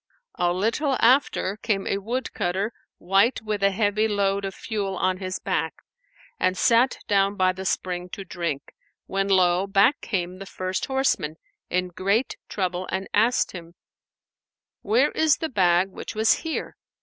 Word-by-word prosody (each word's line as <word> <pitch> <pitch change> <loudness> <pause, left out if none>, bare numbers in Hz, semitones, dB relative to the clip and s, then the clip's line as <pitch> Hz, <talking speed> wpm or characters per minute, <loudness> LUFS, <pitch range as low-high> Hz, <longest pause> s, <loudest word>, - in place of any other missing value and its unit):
A 175 0 +2
little 230 - 0
after 235 -6 +3
came 205 -3 -1
a 195 - -1
woodcutter 210 -3 -2 0.2
wight 195 +7 +2
with 210 -2 -2
a 200 - +5
heavy 205 +2 +1
load 200 -1 0
of 195 - -5
fuel 200 -4 -3
on 185 0 +1
his 185 -1 -4
back, 160 - -2 0.6
and 185 0 +1
sat 235 +5 +3
down 200 0 +2
by 185 -2 +2
the 190 +1 -7
spring 180 -1 -2
to 195 - -6
drink, 170 -6 -4 0.3
when 195 0 -1
lo! 185 -1 +3
back 200 +8 +3
came 180 -3 -3
the 195 - -8
first 185 0 -3
horseman 265 - 0 0.3
in 180 0 0
great 200 +8 0
trouble 185 -2 -2
and 190 +1 -3
asked 230 +4 +3
him, 170 -1 -10 1.1
"Where 240 +8 +2
is 315 -3 +3
the 320 - -3
bag 185 -4 +3
which 195 - -8
was 220 +1 +4
here?" 325 -1 -4
195 Hz, 155 wpm, -24 LUFS, 185-220 Hz, 1.1 s, a